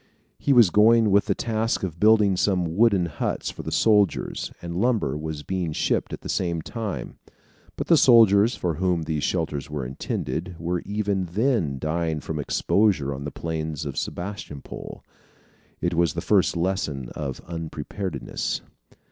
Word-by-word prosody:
He 140 - 0
was 120 -8 +6
going 110 +1 +5
with 100 +1 +4
the - - +1
task 115 -1 -1
of 85 -3 -4
building 105 -2 +5
some 90 -3 0
wooden 100 -5 +4
huts 85 - -3
for - - -8
the - - -6
soldiers, 105 -4 +2
and 85 -1 -6
lumber 120 -8 +1
was 75 -1 -5
being 90 -3 -2
shipped - - 0
at - - -6
the - - -8
same 85 -3 -1
time. 110 -1 -5 0.6
But - - -3
the 165 - +5
soldiers 115 -3 +6
for 85 -2 -1
whom 90 -2 +1
these 80 -2 -2
shelters 75 -6 -2
were 75 -3 -4
intended 85 +6 -4
were 85 +1 -2
even 100 -2 -1
then 95 - 0
dying 80 +2 -1
from 75 0 -5
exposure 75 -1 +1
on 70 +1 -6
the 75 - -4
plains 80 -2 -4
of 70 -2 -5
Sebastopol. 90 -6 -6 0.8
It 85 - 0
was 85 -3 +1
the - - -2
first - - +2
lesson 85 -8 -2
of 70 -4 -5
unpreparedness. 80 0 -4
90 Hz, 155 wpm, -24 LUFS, 80-105 Hz, 0.8 s, was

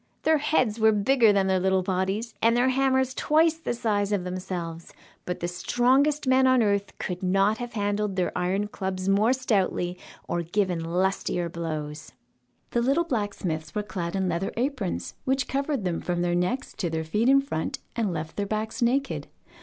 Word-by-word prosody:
Their 315 -1 +4
heads 255 -7 +1
were 220 0 +5
bigger 220 +2 +4
than 200 -1 +2
their 190 -1 +2
little 190 0 +2
bodies, 195 +5 -1
and 230 +1 +4
their 250 +2 +3
hammers 265 0 +2
twice 315 +4 +3
the 320 -7 -4
size 210 -3 0
of 200 -3 0
themselves, 180 -2 -5 0.3
but 180 - -4
the 175 - -1
strongest 260 +11 +2
men 260 0 +4
on 255 -2 +4
earth 200 -1 0
could 180 -1 -4
not 195 +3 +2
have 245 -1 -5
handled 205 -1 -1
their 180 -2 -1
iron 190 +3 0
clubs 190 -2 -4
more 205 +4 +4
stoutly 195 -8 0 0.3
or 175 - -1
given 175 0 -1
lustier 175 0 0
blows. 155 -3 -5 0.6
The 235 - +1
little 275 +7 +2
blacksmiths 195 - -3
were 210 - 0
clad 180 -4 -4
in 190 -1 0
leather 175 +2 -1
aprons, 235 - -2
which 265 +1 0
covered 275 -5 -1
them 175 -2 -1
from 175 -1 -1
their 175 0 +1
necks 180 +11 -1
to 175 - -1
their 160 0 -2
feet 210 +10 +1
in 275 0 +7
front, 275 - -3 0.2
and 220 -5 0
left 160 -1 -5
their 200 -1 -1
backs 215 +3 -3
naked. 265 +4 0
205 Hz, 180 wpm, -26 LUFS, 180-250 Hz, 0.6 s, in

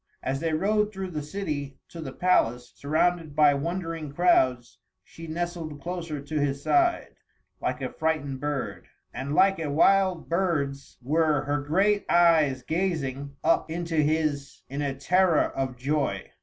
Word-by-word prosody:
As 135 +1 -1
they 165 +1 -1
rode 210 +6 +1
through 190 -2 -5
the 155 -2 -3
city 150 -5 -4
to 170 - -8
the 135 -4 -6
palace, 125 -8 +1
surrounded 155 +1 0
by 150 -1 +6
wondering 165 0 -3
crowds, 130 -7 +2 0.2
she 165 0 -11
nestled 165 -2 -4
closer 170 -2 -5
to 150 +2 -3
his 140 -1 -1
side, 345 -1 +1 0.4
like - - -2
a - - -3
frightened 150 -4 -1
bird, 145 -2 -4 0.3
and 140 +3 -4
like 195 +1 +4
a 155 -3 -2
wild 185 +3 +3
birds 150 -6 -1
were 155 +3 +2
her 145 +1 -1
great 195 +8 +1
eyes 160 -7 +4
gazing 140 -5 -2
up - - +2
into 165 0 -3
his 150 -2 0
in 140 +2 -4
a 140 -2 -2
terror 175 +3 +3
of 130 -2 -3
joy. 135 -7 -2
155 Hz, 150 wpm, -26 LUFS, 140-175 Hz, 0.4 s, by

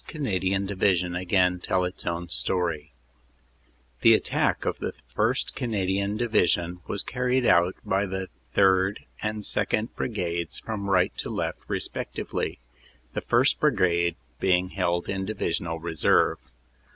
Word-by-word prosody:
Canadian 95 - -1
Division 95 -3 +1
again 90 0 +2
tell 90 +1 0
its 90 - -6
own 85 +1 -2
story: 75 +1 -1 1.1
"The - - +8
attack - - 0
of - - -1
the - - -3 0.2
1st. - - +1
Canadian 100 -4 -1
Division 90 -6 +1
was 100 - -1
carried 125 0 0
out 85 -1 +4
by 100 +1 +1
the 95 0 -3 0.3
3rd. 95 +1 +4 0.2
and 105 0 -2
2nd. 110 +3 0
Brigades 85 -7 -2
from 100 -3 -4
right 95 -1 +3
to - - -3
left - - -2
respectively, - - -3 0.6
the - - -2
1st. 120 +4 +3
Brigade 90 - +2 0.2
being 90 -1 +2
held 85 -2 -1
in 95 -1 -2
divisional 85 -5 -2
reserve. 80 -3 +2
95 Hz, 125 wpm, -26 LUFS, 85-100 Hz, 1.1 s, The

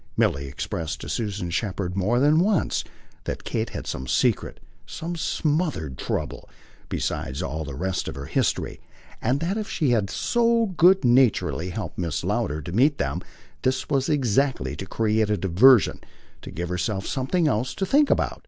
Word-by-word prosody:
Milly 70 0 +1
expressed 80 +3 -4
to 70 - -7
Susan 95 0 -3
Shepherd 95 -1 -2
more 105 +6 +1
than 150 +4 +4
once 195 0 +1 0.4
that - - -4
Kate - - -2
had - - -6
some 65 - -4
secret, - - +1 0.3
some 165 - -5
smothered 150 - -1
trouble, - - -4 0.4
besides 65 +1 -2
all 80 +4 -3
the 70 -3 -7
rest 95 +5 -2
of - - -5
her 70 +1 -6
history; - - -1 0.4
and 125 +5 +1
that 190 +6 -1
if 215 - -5
she 150 -7 +1
had 105 -5 +1
so 235 - +2
good 180 -1 +5
naturedly 120 -8 +3
helped 90 -5 -5
Mrs. 85 -5 -2
Lowder 75 +1 -1
to 85 - -6
meet 135 - +3
them - - -2 0.4
this 130 0 0
was 135 -1 +1
exactly 135 -1 +1
to 95 - -7
create 110 0 +1
a 105 - +1
diversion, 105 +7 +5 0.4
to - - -9
give 85 0 -4
herself 95 +2 -2
something 155 +6 0
else 125 -1 0
to 195 - -1
think 285 +8 +4
about. - - +1
110 Hz, 170 wpm, -24 LUFS, 90-150 Hz, 0.4 s, good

